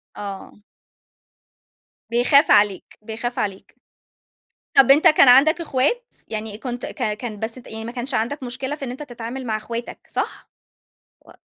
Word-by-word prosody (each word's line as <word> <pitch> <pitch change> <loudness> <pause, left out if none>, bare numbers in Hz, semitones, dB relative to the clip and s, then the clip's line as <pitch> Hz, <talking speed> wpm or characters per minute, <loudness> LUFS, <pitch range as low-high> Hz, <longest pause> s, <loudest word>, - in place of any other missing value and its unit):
آه. 200 0 -8 1.5
بيخاف 265 +5 +4
عليك، 205 -2 +2
بيخاف 230 +3 -5
عليك. 195 -2 -4 1.0
طَب 270 0 +6
أنت 290 +3 +7
كان 305 -3 +6
عندك 280 +7 +6
إخوات؟ 325 - 0 0.2
يعني 215 -1 -5
كنت 245 0 -5
ك 210 - -2
كان 215 -3 -7
بس 225 +2 -4
أنت 250 - -13
يعني 220 0 -7
ما 235 - -6
كانش 250 +2 -5
عندك 250 +5 -1
مشكلة 260 +3 -4
في 285 - -7
إن 250 - -5
أنت 255 +4 -7
تتعامل 245 -1 -7
مع 220 -2 0
إخواتك 230 +2 -6
صح؟ - - -4 0.8
و - - -16
240 Hz, 150 wpm, -22 LUFS, 220-270 Hz, 1.5 s, أنت